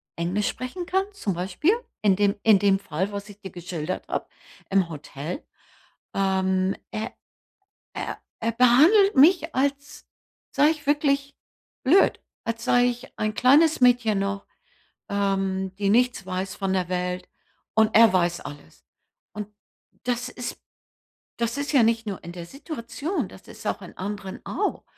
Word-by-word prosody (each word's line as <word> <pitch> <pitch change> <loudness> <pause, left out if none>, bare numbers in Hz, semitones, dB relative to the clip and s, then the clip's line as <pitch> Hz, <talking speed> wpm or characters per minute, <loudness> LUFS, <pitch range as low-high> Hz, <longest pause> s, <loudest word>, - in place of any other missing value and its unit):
Englisch 180 +5 0
sprechen 255 +8 -5
kann, 380 +2 +1
zum 205 - -2
Beispiel, 185 - +1 0.3
in 200 -3 +4
dem 200 0 +2
in 215 -3 +6
dem 195 -1 +4
Fall, 195 +1 -3
was 200 +1 -6
ich 205 0 -13
dir 190 -2 -9
geschildert 175 -1 -5
habe, - - -2 0.4
im 190 -3 +2
Hotel. 150 - -7 0.7
Ähm, 190 -1 +1 0.2
er 215 - -4 0.8
er - - -4 0.2
er 230 +1 0
behandelt 305 - +6
mich, 320 +3 +5
als 280 +2 -2 0.4
sei 295 +2 +4
ich 300 -3 -7
wirklich 280 -1 +1 0.5
blöd, 345 +9 +4 0.2
als 230 0 -4
sei 245 0 +4
ich 245 0 -5
ein 215 0 -1
kleines 290 +5 +4
Mädchen 240 -5 +4
noch, 195 0 -2 0.6
ähm, 195 -1 -1
die 200 -1 0
nichts 245 -2 +2
weiß 185 +1 -3
von 195 -1 -1
der 180 -2 0
Welt. 180 0 -2 0.5
Und 220 0 +3
er 225 -1 +7
weiß 175 -2 +1
alles. 145 - -11 0.5
Und 210 -1 -5 0.6
das 245 0 -1
ist 245 -1 -6 0.8
das 235 +3 -2
ist 285 +1 -2
ja 270 - +6
nicht 225 0 +2
nur 195 -3 -5
in 170 - -7
der 175 -1 -8
Situation, 290 - -4
das - - -14
ist - - -11
auch - - -2
in - - -11
anderen 195 -1 -6
auch. - - -2
210 Hz, 150 wpm, -25 LUFS, 190-255 Hz, 0.8 s, er